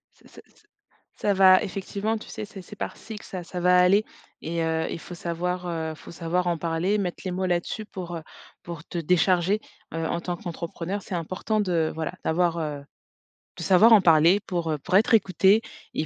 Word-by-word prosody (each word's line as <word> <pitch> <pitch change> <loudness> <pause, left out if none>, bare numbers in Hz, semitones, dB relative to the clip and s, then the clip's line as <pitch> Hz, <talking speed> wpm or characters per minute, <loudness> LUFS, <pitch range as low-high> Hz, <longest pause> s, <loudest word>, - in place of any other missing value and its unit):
C'est - - -21
ça - - -15
ça - - -27 0.5
ça 205 - 0
va 185 -1 +7
effectivement 200 +3 -3
tu 215 - -11
sais? 220 - -6
C'est 200 -1 -10
c'est 210 - -11
par - - -5
cycle 220 -2 -9
ça 180 -2 -6
ça 180 +1 -6
va 180 +1 +4
aller 195 +4 +5 0.4
et 165 +1 -2
heu, 160 0 0
il - - -5
faut 180 - -10
savoir, 180 +1 -3
heu, 160 -2 -3
faut - - -14
savoir 170 +2 -1
en 170 -1 +1
parler, 170 +5 0
mettre 185 -4 -3
les - - -1
mots 185 +1 -2
là 175 -1 +2
dessus 215 +5 -6
pour, 175 -4 -7
heu, 160 - -7 0.4
pour 170 -2 -8
te - - -6
décharger. 180 +4 +2 0.3
Heu, 165 0 -2
en 170 - -2
tant 175 - -3
qu'entrepreneur, 175 +3 -5
c'est - - -8
important 185 +6 -2
de 170 -5 0
voilà, 160 +2 -3
d'avoir, 170 +1 +1
heu, 150 -2 -3 0.8
de - - -5
savoir 195 +6 +6
en 210 - +8
parler 170 +2 +5
pour, 170 -3 -1
heu, 150 - 0
pour 180 +7 -2
être 225 +4 +3
écouté 195 0 +4 0.3
et 155 - -1
180 Hz, 210 wpm, -25 LUFS, 165-195 Hz, 0.8 s, en